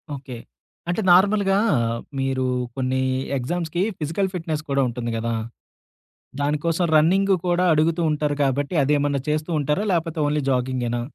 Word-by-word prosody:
Okay. 130 -3 -8 0.5
అంటే, 175 +5 0
నార్మల్‌గా 195 +1 +4 0.6
మీరు 135 -1 0 0.3
కొన్ని 130 0 -1 0.4
ఎగ్జామ్స్‌కి 170 +6 -2 0.2
ఫిజికల్ 165 +6 -1
ఫిట్‌నెస్ 160 -4 -3
కూడా 140 0 +2
ఉంటుంది 120 -1 -4
గదా! 115 +1 -2 1.1
దానికోసం 150 +4 0
రన్నింగు 190 +6 +4
కూడా 175 +1 +2
అడుగుతూ 160 +2 +2
ఉంటారు 150 -1 0
కాబట్టి 140 +5 -1
అదేమన్నా 145 0 +1
చేస్తూ 155 +2 -1
ఉంటారా? 150 +8 0
లేపోతే 165 -1 -1
ఓన్లీ 150 0 0
జాగింగ్‌గేనా? 125 -2 -1
150 Hz, 125 wpm, -23 LUFS, 135-175 Hz, 1.1 s, నార్మల్‌గా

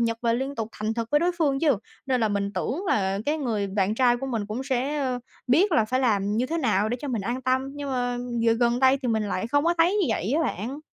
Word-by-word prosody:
nhật 230 -1 0
và 230 -1 +2
liên 265 +4 -2
tục 225 -3 -3
thành 215 +1 -3
thực 230 0 -3
với 295 +1 +3
đối 355 +1 +2
phương 280 -4 +1
chứ. 290 -8 +3 0.3
Nên 255 -2 +1
là 220 - +2
mình 200 0 -1
tưởng 325 - -2
là 195 - +1
cái 305 +2 +1
người 225 -8 -1
bạn 195 +1 0
trai 245 0 +3
của 270 +2 -5
mình 230 -5 -2
cũng 220 +5 -4
sẽ, 265 +2 -1
ơ, 255 -3 -1 0.3
biết 335 +10 +3
là 225 -8 +4
phải 255 +4 0
làm 210 -4 +1
như 245 +3 +1
thế 330 +5 -2
nào 215 - +1
để 240 - -1
cho 290 - -5
mình 230 -6 -2
an 245 +5 -3
tâm, 260 +1 +1
nhưng 285 -1 -5
mà 245 -1 -1 0.2
giờ 230 0 +4
gần 235 +1 +2
đây 265 +1 +5
thì 250 - -1
mình 220 -2 +1
lại 185 - -2
không 285 +5 +1
có 340 +1 +3
thấy 345 +4 +4
như 405 -6 +2
vậy 220 0 -1
á 325 +3 +2
bạn. 255 - -3
245 Hz, 280 wpm, -25 LUFS, 220-275 Hz, 0.3 s, đây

